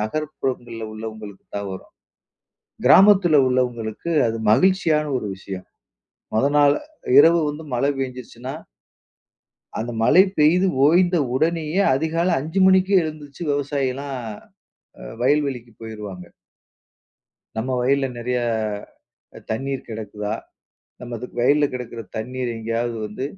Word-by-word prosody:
நகர்ப்புறங்கள்ல 120 -2 -3
உள்ளவங்களுக்கு 110 -2 -8
தான் 100 -1 -4
வரும். 95 - -10 1.0
கிராமத்துல 190 -5 +6
உள்ளவங்களுக்கு 125 +2 -2 0.2
அது 115 0 -2
மகிழ்ச்சியான 160 - +3
ஒரு 105 - -4
விஷயம். 95 -1 -8 0.7
முத 110 +5 +2
நாள் 145 0 +6 0.4
இரவு 165 +3 +7
வந்து 150 +2 -6
மழை 135 +4 +1
பெய்ஞ்சுருச்சுனா 125 -1 -6 1.3
அந்த 120 +2 -3
மழை 185 +10 +7
பெய்து 175 +5 +4 0.2
ஓய்ந்த 175 +3 +4 0.2
உடனேயே 165 +4 +1
அதிகாலை 165 +4 0
5 160 +7 -2
மணிக்கே 190 0 +4
எழுந்துருச்சி 155 0 -7
விவசாயி 140 -2 -1
எல்லாம் 140 +1 -6 0.9
அ - - -9 0.2
வயல்வெளிக்கு 135 -4 0
போயிருவாங்க. 105 -5 -8 1.3
"நம்ம 115 +4 -2
வயல்ல 135 +1 +2
நிறையா 125 0 -1 1.1
தண்ணீர் 135 +4 -3
கிடக்குதா? 105 -1 -5 0.7
நம்மது 120 0 -6
வயல்ல 145 +4 +4
கிடக்கிற 125 -2 -6 0.2
தண்ணீர் 125 +2 -3
எங்கேயாவது 115 +1 -2
வந்து 105 +5 -6
130 Hz, 105 wpm, -22 LUFS, 115-155 Hz, 1.3 s, இரவு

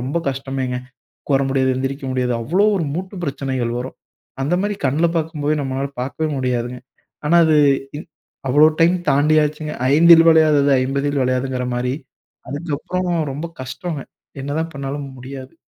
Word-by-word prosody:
ரொம்ப 135 +7 -1
கஷ்டமேங்க. 135 -1 -3 0.5
உக்கார 135 -1 +2
முடியாது, 130 -1 +2
எந்திரிக்க 135 +2 -3
முடியாது 125 -1 0
அவ்வளோ 180 - +2
ஒரு 165 - -1
மூட்டு 185 +4 -5
பிரச்சனைகள் 135 -4 -2
வரும். 130 +2 -6 0.5
அந்த 145 +6 +1
மாரி 205 0 -1
கண்ல 150 +6 +2
பாக்கும்போதே 155 -2 -1
நம்மளால 135 +1 -2
பார்க்கவே 140 +5 -2
முடியாதுங்க. 125 -1 -2 0.5
ஆனா 170 +3 +5
அது 155 -1 +4 0.4
இன் 165 - -9 0.4
அவ்வளோ 150 +4 +6
டைம் 175 +2 +4
தாண்டியாச்சுங்க. 150 +1 +2 0.2
ஐந்தில் 165 +2 +7
வளையாதது 150 -3 +4
ஐம்பதில் 140 +1 0
வளையாதுங்கிற 130 0 -1
மாரி, 125 +1 -1 0.6
அதுக்கப்புறமா 170 +4 -2 0.2
ரொம்ப 150 +4 -4 0.2
கஷ்டங்க. 140 +4 -5 0.4
என்னதான் 155 +4 -3
பண்ணாலும் 140 +1 -5
முடியாது. 130 +1 -9
140 Hz, 135 wpm, -20 LUFS, 130-155 Hz, 0.6 s, ஐந்தில்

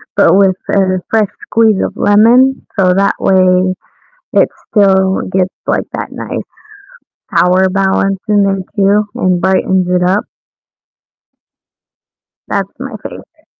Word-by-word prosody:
but - - +4
with 195 -2 +3
a 185 -2 +1
fresh 215 -3 +1 0.2
squeeze 220 -3 +2
of - - -3
lemon, 240 +6 +3
so 185 -1 +3
that 195 +1 +1
way 185 -1 +2 0.6
it - - +3 0.2
still 190 -2 +2
gets, 190 0 0
like, - - 0
that - - -5
nice - - -6 1.0
power 185 +1 +3
balance 195 0 0
in 205 -1 +3
there 195 -1 -1 0.2
too 205 +1 +2
and 180 -1 0
brightens 190 -1 +1
it 180 0 +1
up. 190 +4 +1 2.2
That's 195 -2 -2
my 260 -3 -7
favorite. - - -12
195 Hz, 125 wpm, -13 LUFS, 185-205 Hz, 2.2 s, but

